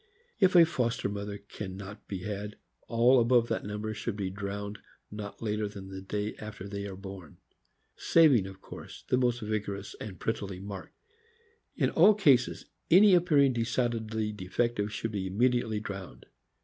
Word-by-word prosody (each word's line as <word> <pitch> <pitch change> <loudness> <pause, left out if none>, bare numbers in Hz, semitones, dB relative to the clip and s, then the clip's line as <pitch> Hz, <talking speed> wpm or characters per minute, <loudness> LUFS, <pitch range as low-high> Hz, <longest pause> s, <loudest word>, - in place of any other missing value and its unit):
If 190 -3 +4
a 170 -1 +9
foster 125 -10 -1
mother 100 0 -5
can 100 -1 -8
not 100 +1 -10
be 95 -3 -5
had, 105 0 -5 0.3
all 120 +2 +5
above 120 0 +3
that - - -1
number 105 +1 -4
should 110 0 -4
be 95 -3 -3
drowned 100 +1 -5 0.3
not 105 +1 -7
later 105 -1 -1
than 100 -2 -9
the 95 0 -7
day 105 +2 -3
after 105 -2 -8
they 100 0 -5
are 95 - -7
born; 95 -4 -10 0.6
saving, 140 - +4
of 95 0 -11
course, - - -10
the 125 - +3
most 120 -1 +1
vigorous 105 -2 -3
and 95 -5 -7
prettily 100 -4 -3
marked. 100 -1 -8 0.8
In - - +1
all 215 - +6
cases, 140 -11 +3 0.2
any 195 +4 +7
appearing 150 -7 +4
decidedly 115 -2 -1
defective 105 +2 -1
should 115 +1 -3
be 100 -3 -2
immediately 115 +1 +1
drowned. 100 - -8
105 Hz, 160 wpm, -29 LUFS, 100-120 Hz, 0.8 s, a